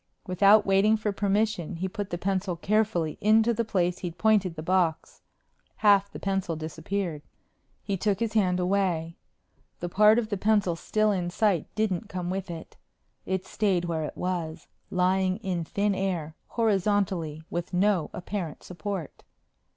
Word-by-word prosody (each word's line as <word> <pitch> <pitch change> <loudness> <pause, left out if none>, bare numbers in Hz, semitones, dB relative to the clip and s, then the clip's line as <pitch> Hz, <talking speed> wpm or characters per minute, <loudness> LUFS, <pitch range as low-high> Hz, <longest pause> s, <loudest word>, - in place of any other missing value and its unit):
Without 200 +3 +5
waiting 200 +3 +4
for 210 -1 -1
permission, 200 -3 0
he 180 +3 -2
put 205 0 -5
the 175 - -3
pencil 185 0 -1
carefully 185 -4 0
into 220 +2 +4
the 230 +1 0
place 180 -5 0
he'd 175 -2 -5
pointed 205 -5 +2
the 155 - -6
box. 175 -2 0 0.5
Half 200 -2 +4
the - - -7
pencil 195 -4 -1
disappeared. 160 +1 -4 0.6
He 200 -2 -2
took 200 +1 0
his 230 -2 -1
hand 185 -4 +2
away. 180 -3 0 0.6
The 175 - -4
part 210 +4 +5
of 225 -3 0
the 205 - -1
pencil 205 -3 +2
still 215 +5 +1
in 180 -3 -1
sight 195 -3 +1
didn't 215 -1 -1
come 180 -2 -3
with 190 0 -4
it. 165 -1 -8 0.5
It 190 -1 -1
stayed 190 -5 0
where 165 -2 -2
it - - -7
was, 175 -3 -3 0.2
lying 185 +1 +1
in 180 -3 -2
thin 200 +5 0
air, 180 -5 -2
horizontally, 195 -7 0
with 175 +1 -3
no 185 -2 +2
apparent 180 -3 -5
support. 185 -2 -6
190 Hz, 155 wpm, -27 LUFS, 175-205 Hz, 0.6 s, Without